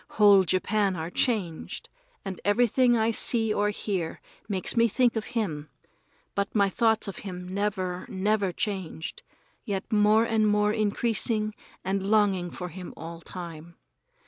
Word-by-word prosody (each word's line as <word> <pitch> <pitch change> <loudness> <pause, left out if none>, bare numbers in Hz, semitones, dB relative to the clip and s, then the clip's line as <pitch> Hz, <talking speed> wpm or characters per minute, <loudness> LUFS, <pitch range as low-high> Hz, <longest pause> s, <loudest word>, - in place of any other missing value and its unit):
Whole 200 -3 +7
Japan 195 +2 +1
are 165 +1 -4
changed, 190 -8 -1 0.4
and 190 -2 -5
everything 240 +3 +3
I 220 +1 +2
see 225 -1 +2
or 205 0 +1
hear 190 -5 -3 0.3
makes 190 +2 -2
me 230 0 +5
think 240 +2 +2
of 220 - -2
him; 155 -9 -2 0.6
but 200 +2 -2
my 200 -2 +4
thoughts 225 0 +2
of 200 - -6
him 180 -2 -7
never, 190 -2 -2
never 200 0 +1
changed, 180 -5 -4 0.4
yet 200 -1 -4
more 210 +1 +5
and 220 -2 +2
more 210 0 +2
increase 215 +1 +1
and 210 -3 -3
longing 200 -4 +2
for 180 +1 -6
him 180 +1 -9
all 165 +1 -8
time. 170 -2 -9
205 Hz, 145 wpm, -27 LUFS, 185-215 Hz, 0.6 s, Whole